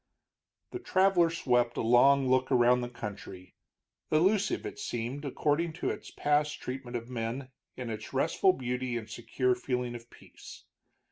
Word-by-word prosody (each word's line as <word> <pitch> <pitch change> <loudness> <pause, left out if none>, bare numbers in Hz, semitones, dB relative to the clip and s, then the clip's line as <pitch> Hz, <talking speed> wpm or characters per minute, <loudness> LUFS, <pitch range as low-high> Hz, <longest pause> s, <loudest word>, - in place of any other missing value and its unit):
The 365 - -5
traveler 190 - +3
swept 125 -7 +1
a - - 0
long 130 +4 +5
look 130 0 +2
around 125 0 +4
the 120 - -4
country, 105 -6 -8 0.6
illusive, 195 - +2
it 410 0 -7
seemed, 125 - -4
according 150 +4 0
to 170 - -2
its - - -8
past 150 0 0
treatment 125 -1 -5
of 115 0 -8
men, 125 +2 -4 0.3
in 125 -3 -5
its 110 0 -7
restful 165 +7 +2
beauty 125 -3 -3
and 110 -2 -6
secure 125 +3 -1
feeling 125 -1 -3
of 120 0 -10
peace. - - -14
125 Hz, 150 wpm, -30 LUFS, 120-150 Hz, 0.6 s, long